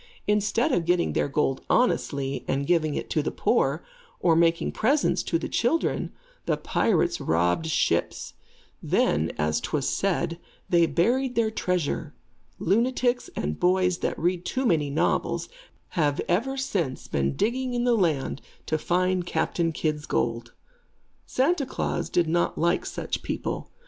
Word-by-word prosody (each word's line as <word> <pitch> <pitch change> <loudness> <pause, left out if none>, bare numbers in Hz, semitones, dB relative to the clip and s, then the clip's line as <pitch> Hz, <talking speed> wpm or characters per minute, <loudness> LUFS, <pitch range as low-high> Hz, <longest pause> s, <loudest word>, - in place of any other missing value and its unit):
Instead 210 +3 +1
of 170 -2 +1
getting 175 0 +1
their - - +1
gold 140 -2 0
honestly, 140 - +1
and 140 +1 0
giving 155 -2 +1
it - - -3
to - - 0
the - - -2
poor, - - +1 0.3
or 170 -2 +3
making 165 0 +2
presents 280 +7 +2
to 165 - 0
the 165 - -4
children, 310 +8 0 0.4
the - - +1
pirates 350 0 +1
robbed 90 - +1
ships. 160 - 0 0.5
Then, 80 +2 +1
as 75 0 0
'twas 145 -3 -1
said, 175 -3 -1 0.3
they 170 -1 +4
buried 245 - +1
their 225 -2 +2
treasure. 170 - -2 0.4
Lunatics 245 +5 +1
and 75 +1 -3
boys 180 0 +2
that - - -2
read 175 +2 0
too 260 +6 -2
many 155 -9 +2
novels, 140 - 0 0.4
have 150 -6 0
ever 240 +10 0
since 175 - -2
been 70 0 -1
digging 250 +3 -1
in 240 - 0
the 245 -1 +3
land 160 -10 0 0.2
to 155 - -1
find 180 +1 0
Captain 165 +1 0
Kidd's 155 -1 -2
gold. 115 0 -1 0.7
Santa 275 +1 +1
Klaas - - -2
does 175 - +2
not 170 +2 0
like 170 +2 +1
such - - -4
people. - - -4
170 Hz, 145 wpm, -26 LUFS, 150-220 Hz, 0.7 s, they